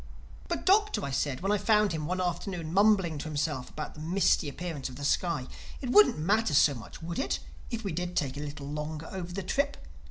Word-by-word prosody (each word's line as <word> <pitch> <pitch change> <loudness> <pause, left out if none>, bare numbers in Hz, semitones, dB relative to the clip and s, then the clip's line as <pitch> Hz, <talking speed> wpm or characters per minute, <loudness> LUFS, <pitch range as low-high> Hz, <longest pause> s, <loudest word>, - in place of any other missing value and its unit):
"But - - -3
Doctor," 420 +2 +3
I 140 - -4
said 135 -1 -1
when 195 +2 0
I 210 - +2
found 210 0 +3
him 155 -2 -3
one 185 +2 -1
afternoon 175 -2 -2
mumbling 190 -6 +4
to - - -5
himself 145 -4 -2
about 155 - -6
the - - -13
misty 165 -2 +2
appearance 155 -3 -5
of 130 - -10
the 145 +2 -5
sky, 160 -3 +1 0.3
"it 255 -3 -3
wouldn't 420 - +7
matter 195 +1 +2
so 145 0 +6
much, 120 +5 -10
would 170 +5 -4
it, 270 - 0 0.3
if 230 -2 -4
we 200 - -2
did 175 +2 -3
take 140 -4 0
a - - -5
little 145 -1 -6
longer 150 +2 -4
over 180 -2 -5
the 195 +2 -4
trip? 280 +9 0
170 Hz, 220 wpm, -29 LUFS, 150-195 Hz, 0.3 s, wouldn't